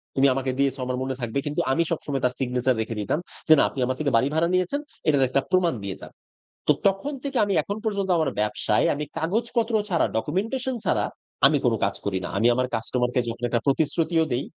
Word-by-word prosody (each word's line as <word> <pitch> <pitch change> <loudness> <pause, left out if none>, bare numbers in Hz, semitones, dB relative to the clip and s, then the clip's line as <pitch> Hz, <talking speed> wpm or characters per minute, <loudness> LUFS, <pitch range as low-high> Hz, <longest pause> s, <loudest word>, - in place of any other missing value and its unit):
তুমি 135 +1 +5
আমাকে 130 0 -1
দিয়েছো 140 -1 +1
আমার 125 0 -2
মনে 130 0 -3
থাকবে।" 120 +3 -1
কিন্তু 150 0 -1
আমি 165 +5 +3
সবসময় 145 -5 -2
তার 125 - +1
সিগনেচার 125 0 +1
রেখে 115 0 -4
দিতাম 105 +9 -1 0.3
যে 160 - +9
"না, - - +5
আপনি - - -8
আমার 130 +1 -2
থেকে 145 -2 0
বাড়ি 130 - +2
ভাড়া 165 +1 +3
নিয়েছেন, 185 +10 +1 0.3
এটার 145 -3 +4
একটা 135 +2 +2
প্রমাণ 180 -4 +3
দিয়ে 100 -2 -4
যান।" - - -10 0.6
তো - - +7 0.2
তখন 195 +10 -1
থেকে 275 -2 -2
আমি 200 - -1
এখন 200 - -4
পর্যন্ত 200 -3 -1
আমার 155 -3 +1
ব্যবসায়, 105 0 +1
আমি 150 +1 -3
কাগজপত্র 225 +6 0 0.2
ছাড়া, 170 -3 +2
ডকুমেন্টেশন 225 - -1
ছাড়া, - - +2 0.4
আমি - - +2
কোনো - - +3
কাজ - - +1
করি 100 -2 0
না। - - -5
আমি 115 - +3
আমার 130 0 +1
কাস্টমার 125 +2 -1
কে - - +4
যখন 115 +1 -5
একটা 120 0 0
প্রতিশ্রুতিও 160 +3 +2
দেই, 125 +3 -1
145 Hz, 215 wpm, -25 LUFS, 125-185 Hz, 0.6 s, যে